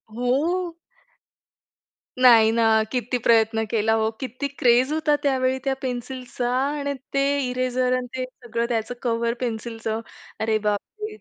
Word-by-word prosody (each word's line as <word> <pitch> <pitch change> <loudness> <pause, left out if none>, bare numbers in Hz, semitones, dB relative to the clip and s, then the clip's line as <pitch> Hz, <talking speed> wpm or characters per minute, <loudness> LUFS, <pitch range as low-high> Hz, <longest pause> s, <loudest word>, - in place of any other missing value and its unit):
हो. 325 +9 0 1.4
नाही 230 -3 +7
ना, 230 0 +2 0.3
किती 250 0 -1
प्रयत्न 225 -1 +3
केला 220 -1 +2
हो. 220 0 +2
किती 260 +1 -4
क्रेज 250 +3 +4
होता 310 -1 +2
त्यावेळी 260 -2 +1
त्या 270 - +1
पेन्सिलचा 250 -1 -4 0.3
आणि 285 -1 -2 0.2
ते 275 0 +2 0.3
इरेजर 255 0 0
अन् 250 -1 -4
ते 260 - -2 0.2
सगळं 235 0 -2
त्याचं 230 0 -1
कव्हर 235 -1 0
पेन्सिलचं 225 -2 -3 0.4
अरे, 220 0 +1
बापरे! 215 - -3
245 Hz, 130 wpm, -23 LUFS, 225-260 Hz, 1.4 s, नाही